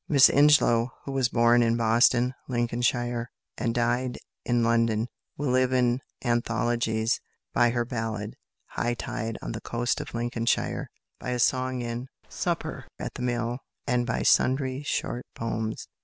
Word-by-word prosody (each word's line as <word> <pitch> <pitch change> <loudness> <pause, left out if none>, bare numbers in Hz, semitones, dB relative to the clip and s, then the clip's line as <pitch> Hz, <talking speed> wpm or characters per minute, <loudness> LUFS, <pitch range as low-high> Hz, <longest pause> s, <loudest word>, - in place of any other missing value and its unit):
Miss 140 -4 +7
Ingelow, 140 -5 +5 0.2
who 140 - -4
was 135 -2 +1
born 120 0 +4
in 115 0 +2
Boston, 120 +2 +3
Lincolnshire, 120 0 0 0.3
and 115 -1 -1
died 120 +1 0 0.3
in 120 -1 +1
London, 115 0 +2 0.3
will 145 -3 -1
live 130 0 +3
in 125 -1 +2 0.3
anthologies 115 -1 0 0.3
by 120 - +4
her 120 0 0
ballad, 110 -3 -3 0.4
"High 120 +1 -1
Tide 115 0 -4
on - - -4
the 115 -1 -5
Coast 120 +1 -1
of - - -8
Lincolnshire," 115 0 -1 0.3
by - - -5
a 125 - 0
song 130 +1 +1
in 120 +2 -4 0.2
"Supper - - -3
at - - -5
the - - -7
Mill," 120 0 -1 0.3
and 125 -2 +1
by 115 - -1
sundry 130 0 +2
short 125 -4 -3
poems. 110 -1 -3
120 Hz, 145 wpm, -27 LUFS, 115-125 Hz, 0.4 s, Miss